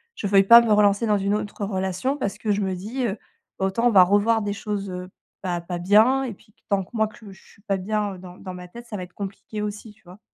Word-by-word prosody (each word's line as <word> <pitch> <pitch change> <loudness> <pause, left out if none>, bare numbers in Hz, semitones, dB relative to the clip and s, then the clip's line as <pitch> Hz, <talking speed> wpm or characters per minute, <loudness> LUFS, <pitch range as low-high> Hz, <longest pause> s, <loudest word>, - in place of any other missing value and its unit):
je 205 - -3
veuille 195 0 +5
pas 235 +4 +9
me 230 - 0
relancer 205 +2 +3
dans 210 -1 +3
une 200 +1 0
autre 210 0 -4
relation 190 +7 -2
parce 205 -5 -3
que 215 -1 -2
je 205 - +1
me 190 -1 -1
dis, 230 +8 -4
heu, 205 0 -3 0.4
autant 195 +5 +1
on - - +3
va 190 -4 +8
revoir 205 +4 +3
des 205 -1 -2
choses, 200 -1 -4
heu, 180 0 -6 0.3
pas 175 -2 -2
pas 175 0 -5
bien 220 +9 +4
et 240 - -4
puis, 205 - -22
que - - -38
tant 200 -2 +1
que - - -18
moi, 220 -1 +1
que 215 -1 -13
je 190 - -16
suis 200 - -21
pas 195 -3 -1
bien 205 0 -2
dans 180 0 -11
dans 185 - -8
ma 180 0 -9
tête, 235 +6 -11
ça 210 - -6
va 185 - -5
être 180 0 -12
compliqué 200 +1 -6
aussi, 210 +1 -6
tu 220 - -30
vois? 180 +2 -14
200 Hz, 275 wpm, -24 LUFS, 190-215 Hz, 0.4 s, pas